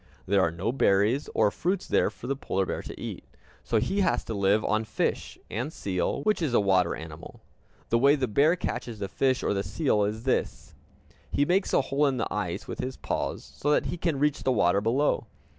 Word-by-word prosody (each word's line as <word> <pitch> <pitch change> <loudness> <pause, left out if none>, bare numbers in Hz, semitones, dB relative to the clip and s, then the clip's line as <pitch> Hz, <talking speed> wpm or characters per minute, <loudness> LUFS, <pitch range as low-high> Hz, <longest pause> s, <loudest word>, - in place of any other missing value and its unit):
There 100 +1 +3
are 95 - +3
no 85 +7 -2
berries 110 +2 +2
or 105 -2 +4
fruits 180 - -1
there - - +2
for - - -12
the 135 +2 -1
polar 95 -7 -1
bear - - -3
to - - -9
eat; - - -6 0.4
so 115 - 0
he 195 - +1
has - - +1
to 115 - -5
live 100 +1 +2
on 110 +1 +1
fish, 110 - -2
and 125 +9 -3
seal, 100 - -2
which 215 -3 +1
is 140 -7 0
a - - +6
water 95 -3 +2
animal. 80 +1 -10 0.5
The 115 - +3
way 140 +3 +5
the 135 -3 -1
bear 145 +10 +3
catches 120 -9 -4
the 100 -1 -3
fish 130 +6 0
or - - +1
the 100 - 0
seal 105 - +1
is 110 +2 -3
this: 130 - -1 0.6
He 145 - +1
makes 185 +5 +1
a - - +4
hole 140 +2 +1
in 135 -2 0
the 115 - -2
ice - - -3
with - - -6
his 130 +1 -4
paws, - - -3
so 145 - -2
that 150 - +3
he - - -3
can 165 -5 0
reach 150 +1 +1
the 130 - +1
water 100 -4 +3
below. 120 +2 +1
120 Hz, 220 wpm, -27 LUFS, 100-145 Hz, 0.6 s, a